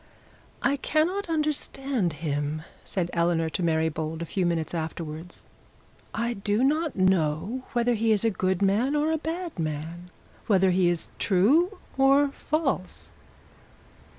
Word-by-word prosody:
'I 280 Hz, +1 st, +2 dB
cannot 335 Hz, +7 st, 0 dB
understand 275 Hz, -, -1 dB
him,' 150 Hz, 0 st, -2 dB, 0.2 s
said 180 Hz, -3 st, -2 dB
Eleanor 170 Hz, -1 st, +1 dB
to -, -, -2 dB
Mary 160 Hz, -1 st, +2 dB
Bold, 160 Hz, +1 st, -3 dB
a -, -, -4 dB
few 180 Hz, +1 st, 0 dB
minutes 165 Hz, -1 st, -1 dB
afterwards. 160 Hz, 0 st, -5 dB, 0.7 s
'I 235 Hz, +2 st, 0 dB
do 205 Hz, +2 st, 0 dB
not 305 Hz, +2 st, +1 dB
know 185 Hz, +4 st, +1 dB
whether 240 Hz, 0 st, +2 dB
he 225 Hz, 0 st, +1 dB
is 215 Hz, +1 st, +3 dB
a 225 Hz, -, +3 dB
good 185 Hz, 0 st, 0 dB
man 225 Hz, +9 st, +2 dB
or 300 Hz, +2 st, +2 dB
a 320 Hz, -, 0 dB
bad 330 Hz, -, -4 dB
man 160 Hz, +3 st, -4 dB, 0.4 s
whether 190 Hz, -3 st, +4 dB
he 180 Hz, -1 st, +3 dB
is 175 Hz, -2 st, -1 dB
true 295 Hz, -, +3 dB, 0.2 s
or 275 Hz, +1 st, +5 dB
false.' 280 Hz, -, -2 dB
195 Hz, 140 wpm, -26 LUFS, 165-275 Hz, 0.7 s, or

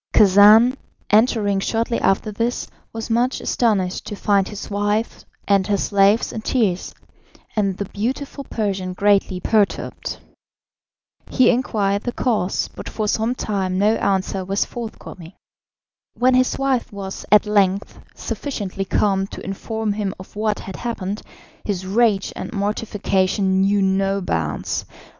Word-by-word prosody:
Khacan, 210 Hz, +5 st, +7 dB, 0.4 s
entering 210 Hz, -2 st, +3 dB
shortly 230 Hz, +3 st, -1 dB
after 195 Hz, +2 st, +1 dB
this, 230 Hz, +4 st, -2 dB, 0.2 s
was 225 Hz, 0 st, -6 dB
much 245 Hz, +3 st, +1 dB
astonished 200 Hz, -6 st, 0 dB
to 205 Hz, -, -4 dB
find 200 Hz, -1 st, +2 dB
his 210 Hz, -, -7 dB
wife 205 Hz, +2 st, -1 dB, 0.2 s
and 195 Hz, -2 st, +3 dB
her 205 Hz, -1 st, +2 dB
slaves 200 Hz, +2 st, +2 dB
in 220 Hz, -, -4 dB
tears, 215 Hz, -7 st, 0 dB, 0.6 s
and 195 Hz, -3 st, 0 dB
the 200 Hz, -, -3 dB
beautiful 265 Hz, +8 st, -4 dB
Persian 195 Hz, -5 st, -2 dB
greatly 195 Hz, -1 st, +2 dB
perturbed. 210 Hz, +1 st, 0 dB, 1.1 s
He 255 Hz, -, +4 dB
inquired 205 Hz, -5 st, 0 dB
the 245 Hz, -, -3 dB
cause, 215 Hz, -7 st, 0 dB
but -, -, -8 dB
for 215 Hz, -1 st, -2 dB
some 225 Hz, +4 st, 0 dB
time 190 Hz, -5 st, -2 dB
no 210 Hz, +3 st, +3 dB
answer 190 Hz, 0 st, 0 dB
was 195 Hz, +2 st, 0 dB
forthcoming. 195 Hz, -7 st, -8 dB, 0.8 s
When 255 Hz, +1 st, +3 dB
his 255 Hz, 0 st, +2 dB
wife 270 Hz, -3 st, 0 dB
was 195 Hz, -1 st, -6 dB
at 210 Hz, +1 st, +6 dB
length 200 Hz, -1 st, +1 dB, 0.2 s
sufficiently 200 Hz, -8 st, -4 dB
calm 195 Hz, 0 st, +1 dB
to -, -, -9 dB
inform 215 Hz, +2 st, -3 dB
him 200 Hz, -2 st, -3 dB
of 185 Hz, -, -12 dB
what 215 Hz, 0 st, -1 dB
had 190 Hz, -, -8 dB
happened, 210 Hz, -4 st, -4 dB, 0.4 s
his 190 Hz, -3 st, -3 dB
rage 205 Hz, 0 st, +2 dB
and -, -, -6 dB
mortification 195 Hz, -2 st, 0 dB
knew 200 Hz, +1 st, +3 dB
no 195 Hz, +1 st, +1 dB
bounds. 80 Hz, -, -2 dB
205 Hz, 135 wpm, -21 LUFS, 195-225 Hz, 1.1 s, Khacan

